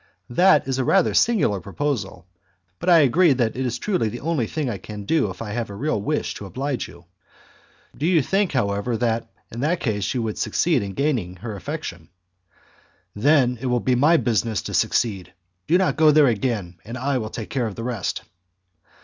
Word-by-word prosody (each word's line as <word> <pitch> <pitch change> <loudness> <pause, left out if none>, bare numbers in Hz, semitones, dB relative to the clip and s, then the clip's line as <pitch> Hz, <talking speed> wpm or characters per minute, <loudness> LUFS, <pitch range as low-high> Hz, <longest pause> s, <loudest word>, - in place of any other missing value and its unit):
"That 175 +2 +4
is 135 -1 -1
a - - +2
rather 190 +7 +3
singular 200 - +2
proposal, 100 - -3 0.5
but 180 - -1
I 170 -2 +7
agree 150 +4 +4
that 120 -4 0
it 130 - -2
is 120 - -2
truly 180 - 0
the 120 - -7
only 155 -7 -1
thing 155 +2 -3
I 110 -6 -3
can 105 +1 -8
do 155 -5 +1
if 95 +4 -7
I 105 - -6
have 115 -1 -3
a 100 - -7
real 110 -2 -1
wish 150 +9 -1
to 100 - -8
oblige 135 +4 -3
you. 85 0 -15 0.9
Do 150 - -1
you 170 -5 +3
think, 195 +5 +1
however, 110 -1 0
that 115 -1 -1 0.2
in 115 - -7
that 160 +7 0
case 105 -5 -1
you 120 - 0
would 110 -1 -4
succeed 140 +5 +1
in 100 -1 -5
gaining 125 -11 -1
her 110 +3 -7
affection?" 100 - -6 1.1
"Then 125 +1 +3
it 135 - -2
will 125 0 +2
be 125 - +1
my 150 +7 +4
business 115 - 0
to - - -6
succeed. 95 -6 0 0.3
Do 170 - +4
not 190 -1 +1
go 155 -1 +6
there 150 0 +6
again, 105 -7 -1
and 115 +3 -7
I 130 +1 0
will 110 -2 -4
take 110 -1 -7
care 125 -4 0
of 105 - -7
the 115 - -6
rest." 115 -6 -3
120 Hz, 200 wpm, -23 LUFS, 105-150 Hz, 1.1 s, I